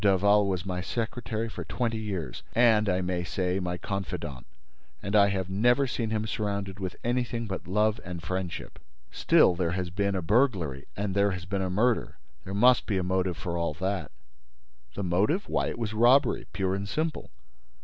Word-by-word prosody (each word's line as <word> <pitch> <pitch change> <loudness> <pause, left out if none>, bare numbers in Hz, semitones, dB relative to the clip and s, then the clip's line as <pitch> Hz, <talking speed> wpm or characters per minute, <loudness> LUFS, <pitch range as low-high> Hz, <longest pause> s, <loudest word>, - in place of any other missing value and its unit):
Daval 100 +1 +4
was 95 -2 -2
my 90 -1 -3
secretary 115 +1 -3
for 110 - -6
twenty 115 -3 -2
years 100 -7 -4
and, 110 -3 +4
I 90 0 +1
may 90 -1 -1
say, 90 +3 -1
my 90 -1 -2
confidant; 90 -10 -5 0.5
and 100 +7 -3
I 100 -1 +7
have 95 -2 -1
never 120 +8 +3
seen 120 -3 -2
him 110 0 -1
surrounded 100 -3 -3
with 95 -2 -4
anything 120 -1 -1
but 95 -3 -5
love 105 +3 +1
and 90 -1 -6
friendship." 90 +1 -5 0.3
"Still, - - +4
there 85 -1 -1
has 90 -2 -3
been 100 +1 0
a 95 - -2
burglary 90 - +1
and 100 -1 -1
there 100 +1 +3
has 90 -3 -4
been 95 +1 -2
a 95 - -1
murder: 110 +6 +1 0.3
there 95 - -5
must 125 +3 +5
be 100 - 0
a 95 - 0
motive 90 -1 0
for 85 -1 -3
all 85 -3 -1
that." 95 +3 -2 0.9
"The 100 - -3
motive? 100 - +1
Why, - - 0
it - - -4
was 110 -2 -3
robbery 120 +4 +4
pure 95 -1 -1
and 100 +1 -3
simple." 155 +3 -2
100 Hz, 185 wpm, -28 LUFS, 90-110 Hz, 0.9 s, I